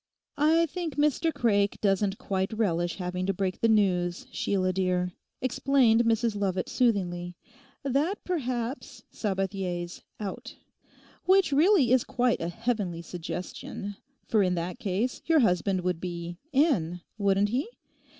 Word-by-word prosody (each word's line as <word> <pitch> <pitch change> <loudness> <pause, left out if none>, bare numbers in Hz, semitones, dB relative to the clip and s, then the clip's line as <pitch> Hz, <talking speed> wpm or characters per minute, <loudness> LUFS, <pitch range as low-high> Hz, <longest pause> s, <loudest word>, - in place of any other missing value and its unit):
'I 320 +3 +4
think 335 -1 -4
Mr 300 +2 +2
Craik 205 -7 +1
doesn't 195 0 +1
quite 190 -1 -2
relish 175 -6 0
having 180 0 -3
to 195 - 0
break 185 0 -2
the 230 - +4
news, 180 -5 +2
Sheila 185 -2 0
dear,' 180 -1 0 0.3
explained 250 -3 +3
Mrs 230 -1 +2
Lovat 190 -3 -1
soothingly, 180 -7 0 0.5
'that 285 +9 0
perhaps 255 -6 -3
Sabathier's 190 -3 -3 0.2
out. 205 -3 -6 0.7
Which 380 -3 +4
really 300 - +4
is 255 -2 +5
quite 245 -1 0
a 165 - -2
heavenly 200 -4 -2
suggestion, 180 +4 -6 0.3
for 215 - +3
in 180 -2 +2
that 175 +1 -4
case 210 +6 -1
your 320 -2 +5
husband 185 -2 +2
would 180 -2 -1
be 175 -1 -5
in, 220 - +2 0.2
wouldn't 200 0 +3
he? 255 - -1
200 Hz, 130 wpm, -28 LUFS, 180-250 Hz, 0.7 s, is